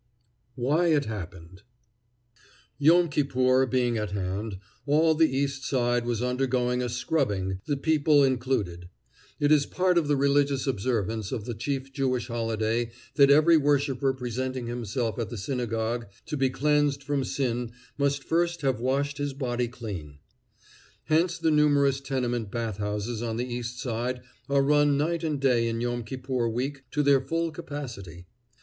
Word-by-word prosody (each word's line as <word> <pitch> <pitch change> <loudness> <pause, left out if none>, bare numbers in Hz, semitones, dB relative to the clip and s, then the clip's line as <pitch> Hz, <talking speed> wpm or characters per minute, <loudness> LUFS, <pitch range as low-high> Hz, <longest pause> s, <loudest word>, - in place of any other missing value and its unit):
WHY 145 +7 +1
IT 150 -4 +3
HAPPENED 95 -3 -8 1.2
Yom 170 +4 +5
Kippur 130 -3 +2
being 120 -2 +1
at 105 -2 -2
hand, 100 +2 -3 0.3
all 160 +3 +4
the 160 0 +3
East 135 0 -1
Side 120 -3 +1
was 120 -1 -1
undergoing 125 -1 0
a 125 - -2
scrubbing, 105 -8 -1
the 145 -2 0
people 150 -1 +3
included. 120 -10 -1 0.5
It 145 0 +2
is 145 -2 +4
part 180 -1 +2
of 155 - -2
the 145 - +3
religious 140 0 +2
observance 110 -4 -1
of 105 - -4
the 120 - -4
chief 135 +4 -4
Jewish 130 -3 -1
holiday 115 0 -1 0.2
that 140 -2 +5
every 155 +3 +6
worshiper 140 -2 +2
presenting 130 0 -4
himself 120 0 -3
at 115 - -2
the 120 - -6
synagogue 115 0 -2 0.2
to 160 - -4
be 135 -2 +2
cleansed 145 0 +1
from 140 -1 -1
sin 120 -3 -2 0.2
must 140 -1 0
first 170 +2 0
have 135 -5 0
washed 140 +3 -1
his 145 -1 -2
body 125 -3 -2
clean. 100 - -7 0.9
Hence 170 +3 +1
the 160 - +1
numerous 145 -2 +3
tenement 120 -5 -2
bath 115 -2 -3
houses 105 +2 -3
on 115 -1 -2
the 120 - -1
East 120 0 -5
Side 125 +1 -2 0.3
are 140 0 +3
run 145 0 +3
night 165 +3 0
and 150 -3 -1
day 125 -4 +2
in 115 0 -2
Yom 120 0 -2
Kippur 130 0 -2
week 135 +4 -3
to 150 +3 0
their 140 -2 +4
full 165 +4 -1
capacity. 115 - -8
130 Hz, 155 wpm, -27 LUFS, 115-145 Hz, 1.2 s, every